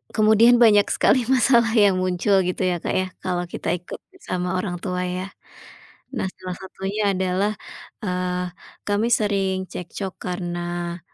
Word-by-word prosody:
kemudian 220 +2 +6
banyak 210 -3 +6
sekali 255 -3 +3
masalah 240 -3 +4
yang 200 -3 +5
muncul 185 +2 +2
gitu 180 +1 -2
ya, 175 -1 +1
Kak, - - -1
ya, 185 0 +1 0.2
kalau 180 -1 -1
kita - - -3
ikut 180 0 -8 0.2
sama 180 - -2
orang 180 -2 -3
tua 180 -1 -3
ya. 185 +1 -3 0.9
Nah, 205 -6 -2
salah 185 -1 -6
satunya 195 +2 -2
adalah, 190 +3 0 0.5
eee, 180 -1 -2 0.4
kami 205 +3 +1
sering 195 -3 0
cekcok 185 +2 -6
karena 175 -1 -4
185 Hz, 140 wpm, -23 LUFS, 180-205 Hz, 0.9 s, kemudian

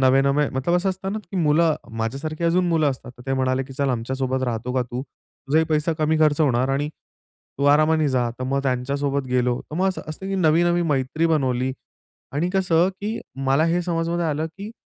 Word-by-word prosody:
नवे-नवे 135 +2 +3
मतलब 135 +7 0
असं 180 +2 0
असतं 190 +1 -3
ना 215 - -2
की 195 - -4
मुलं 160 -1 +3 0.2
माझ्यासारखी 140 +8 -3
अजून 180 +2 +3
मुलं 155 -4 +3
असतात. 125 -1 -7
तर - - -11
ते 135 - 0
म्हणाले, 130 0 +1
की 135 - -11
"चल 140 +1 -1
आमच्यासोबत 130 +2 -2
राहतो 120 0 -3
का 130 - +2
तू? 125 +1 -5
तुझाही 145 +3 -2
पैसा 155 +1 0
कमी 155 0 +2
खर्च 155 0 +3
होणार 130 -3 +2
आणि 140 +2 0 0.7
तू 140 - 0
आरामाने 155 0 +3
जा." 125 -3 +1
तर 130 - -3
मग 135 +1 0
त्यांच्यासोबत 140 +2 -1
गेलो. 125 -1 +1
तर - - -5
मग 185 +2 +2
असं 190 - -4
असतं, 155 +5 -6
की 195 - -2
नवी-नवी 175 0 +3
मैत्री 145 +1 0
बनवली. 130 -5 +1 0.6
आणि 155 +5 0
कसं 180 -2 +3
की 215 +3 -3 0.3
मला 135 +4 +3
हे 170 +2 +1
समजमध्ये 170 0 -1
आलं, 155 +1 -1
की 195 +6 -9
150 Hz, 200 wpm, -23 LUFS, 130-165 Hz, 0.7 s, नवे-नवे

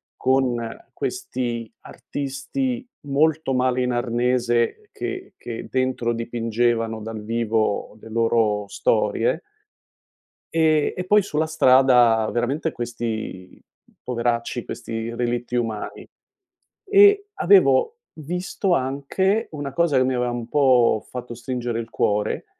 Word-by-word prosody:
con 125 -3 +1 0.2
questi 120 - -3
artisti 245 - -4 0.2
molto 150 0 +1
male 125 0 +1
in 125 - 0
arnese 120 -1 0
che - - -6
che 115 -1 -7
dentro 130 -2 0
dipingevano 115 -1 -1
dal 110 0 -6
vivo 110 -2 -1
le 115 - -11
loro 110 -2 +1
storie - - +1 1.1
e 155 -2 +3
e 180 - -3
poi 210 +2 +5
sulla 155 -4 -1
strada 125 -7 +4
veramente 140 +7 -1
questi 115 -6 -5 0.4
poveracci, 120 -1 -1
questi 115 0 -5
relitti 120 0 -2
umani, 115 -3 -3 0.8
e 405 0 +5
avevo 445 +4 +4 0.2
visto 180 +4 -2
anche 155 - 0
una 145 -3 -5
cosa 170 -4 +2
che 130 - +4
mi 130 0 0
aveva 125 0 0
un 120 -1 -5
po' 125 -6 +3
fatto 125 -1 -7
stringere 120 -1 -3
il 115 -1 -6
cuore: 105 0 0
125 Hz, 110 wpm, -23 LUFS, 115-145 Hz, 1.1 s, poi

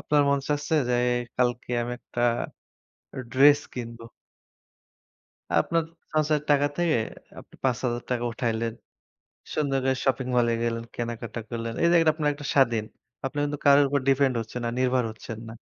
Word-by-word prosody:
আপনার 150 -1 +3
মন 140 - +3
চাচ্ছে 150 +2 0
যে 125 - +2 0.4
কালকে 125 -1 0
আমি 120 +1 -4
একটা 120 - -7 1.1
ড্রেস 145 +2 +7
কিনবো। 115 -2 -7 1.6
আপনার 165 - 0 0.3
সঞ্চয়ের 155 -1 +2
টাকা 145 0 +4
থেকে 170 -7 +2 0.4
আপনি - - -16
৫০০০ 120 -1 -1
উঠাইলেন। 115 -1 -1 0.8
সুন্দর 140 -3 +1
করে 130 0 +2
শপিং 130 -1 +1
মলে 120 -1 +3
গেলেন, 115 0 -1
কেনাকাটা 115 -1 -4
করলেন। 115 -1 -4
এই 170 - +5
জায়গাটা 165 -2 +5
আপনার 150 -2 0
একটা 145 -1 -8
স্বাধীন। 120 -6 +3 0.4
আপনারা 145 +2 -1
কিন্তু 145 0 -4
কারো 140 0 +8
উপর 140 +1 +1
ডিপেন্ড 135 -1 +3
হচ্ছেন 115 +2 -6
না, 115 - 0
নির্ভর 130 -1 +2
হচ্ছেন 110 0 -8
না। - - -8
130 Hz, 145 wpm, -26 LUFS, 115-145 Hz, 1.6 s, কারো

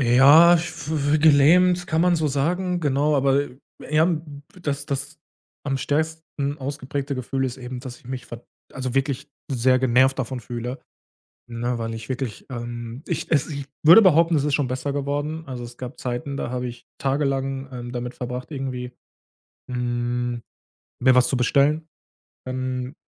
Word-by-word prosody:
Ja, 140 +7 +7
ich 165 - +2
f 155 -2 0
gelähmt, 175 +5 +5
kann 160 -3 +1
man 180 0 +4
so 155 -2 +1
sagen, 175 +6 0
genau, 145 0 +2
aber, 140 +1 +3
äh, 130 -2 -13 0.2
eher, 155 +1 +2
hm, 155 -4 -3 0.2
dass 145 -2 -2
das 140 +3 -4 0.5
am 135 -1 0
stärksten 150 0 -2
ausgeprägte 140 0 -4
Gefühl 135 +1 -2
ist 130 -1 -3
eben, 125 -1 -7
dass 125 -1 -8
ich - - -20
mich, 130 -1 -6
verd 120 0 -10 0.3
also 130 -2 -4
wirklich 135 +1 -1 0.2
sehr 130 0 +3
genervt 130 +1 +3
davon 130 0 -3
fühle, 120 +2 -5 0.7
ne, 120 +1 -2
weil 115 0 -3
ich 110 -1 -8
wirklich 130 -3 -4
ähm, 120 0 -6
ich - - -3
es 145 -4 +2
ich 140 -2 -5 0.2
würde 170 +8 +9
behaupten, 170 -3 +5
es 145 - +1
ist 150 -1 +1
schon 145 -4 +1
besser 130 +3 -2
geworden. 145 +3 -2
Also, 125 -3 -6
es 120 0 -10
gab 125 0 -8
Zeiten, 125 +3 -3
da 120 - -3
habe 125 0 -2
ich 120 -1 -9
tagelang, 135 -1 -1
ähm, 120 -1 -6
damit 125 0 -4
verbracht, 125 +2 -5
irgendwie, 130 -3 -4 0.8
hm, 120 0 -2 0.6
mir 130 0 +5
was 125 0 +5
zu 135 - 0
bestellen. 145 +5 +2 0.6
Dann 130 +1 -3
135 Hz, 165 wpm, -23 LUFS, 125-150 Hz, 0.8 s, würde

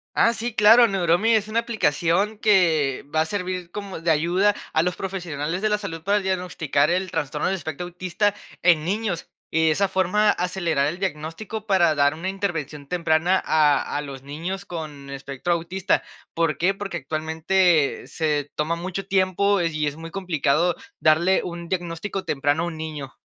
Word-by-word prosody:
Ah, 230 - +4
sí, 235 +1 -3
claro, 225 +3 +7
Neuromi 195 +3 +2
es 215 0 +1
una 225 +2 0
aplicación 200 -1 0
que 165 - +2
va 155 - +4
a - - +1
servir 180 -1 -4
como 200 -4 -6
de 165 0 +2
ayuda 175 +7 +2 0.2
a 160 - +3
los 180 -1 -1
profesionales 175 -3 -3
de 215 - +1
la 210 - +2
salud 165 -6 -6
para 200 +3 +2
diagnosticar 180 -6 0
el 185 +1 0
trastorno 150 -1 -2
del 195 - +1
espectro 160 0 -5
autista 185 +3 -1 0.3
en 170 -4 +4
niños, 195 0 -2 0.2
y 160 0 +2
de - - +4
esa 195 +5 +2
forma 190 +3 +2
acelerar 175 -5 0
el 170 +4 -4
diagnóstico 190 +5 -4
para 175 -6 +3
dar 145 0 +3
una 165 +4 -5
intervención 165 -7 -3
temprana 175 +2 +2
a 150 -3 +2
a 145 - 0
los 140 -2 -8
niños 165 +7 -5
con 150 -5 -7
espectro 140 +4 -3
autista, 175 +3 0 0.3
¿por 165 -3 0
qué? 185 +4 +2
Porque 195 -3 -5
actualmente 160 +2 +1
se 150 -3 -1
toma 155 +2 0
mucho 185 +3 -5
tiempo 195 0 +2
y 155 -3 0
es 145 - -3
muy 165 +1 -9
complicado 175 -2 +1 0.2
darle 170 +4 +3
un 170 -1 -7
diagnóstico 175 +2 -3
temprano 145 +3 0
a - - -1
un 170 - -5
niño. 155 -4 -6
175 Hz, 175 wpm, -23 LUFS, 155-190 Hz, 0.3 s, claro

